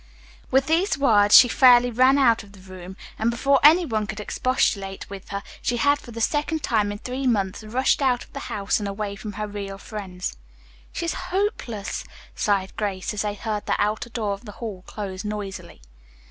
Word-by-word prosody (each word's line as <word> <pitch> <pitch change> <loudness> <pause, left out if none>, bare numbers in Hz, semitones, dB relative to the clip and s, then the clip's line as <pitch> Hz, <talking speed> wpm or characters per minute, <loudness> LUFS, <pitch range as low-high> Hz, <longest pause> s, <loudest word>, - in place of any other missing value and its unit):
With 265 +1 +3
these 330 +2 +1
words 210 -7 +6
she 250 - +9
fairly 245 0 +6
ran 255 +4 +4
out 235 -5 +4
of 200 -2 -16
the 200 - -15
room, 185 0 -11 0.2
and 225 - +2
before 275 +3 +2
any 330 +4 +7
one 215 -6 -2
could 210 - -6
expostulate 200 -4 -1
with 195 -1 -9
her, 200 0 -4 0.2
she 240 - -1
had 285 +4 +3
for - - -14
the 230 0 -7
second 295 +5 0
time 210 -3 +1
in 205 - -5
three 255 +4 -4
months 200 -3 0
rushed 250 +6 +1
out 255 -3 +2
of - - -21
the 280 - -5
house 200 +1 0
and 205 - -3
away 200 0 -4
from 210 +1 -7
her 210 +1 -4
real 200 -1 -6
friends. 195 -3 -6 0.5
"She 340 - -4
is 335 - -1 0.2
hopeless," 360 - -2 0.3
sighed 195 -2 0
Grace, 200 -3 -2
as 205 - -2
they 210 -1 -2
heard 210 0 -4
the - - +2
outer 215 +3 -1
door 220 -4 -2
of 200 +4 -9
the 210 - -9
hall 205 -6 -7
close 195 -2 -6
noisily. 205 - -6
215 Hz, 200 wpm, -24 LUFS, 200-255 Hz, 0.5 s, she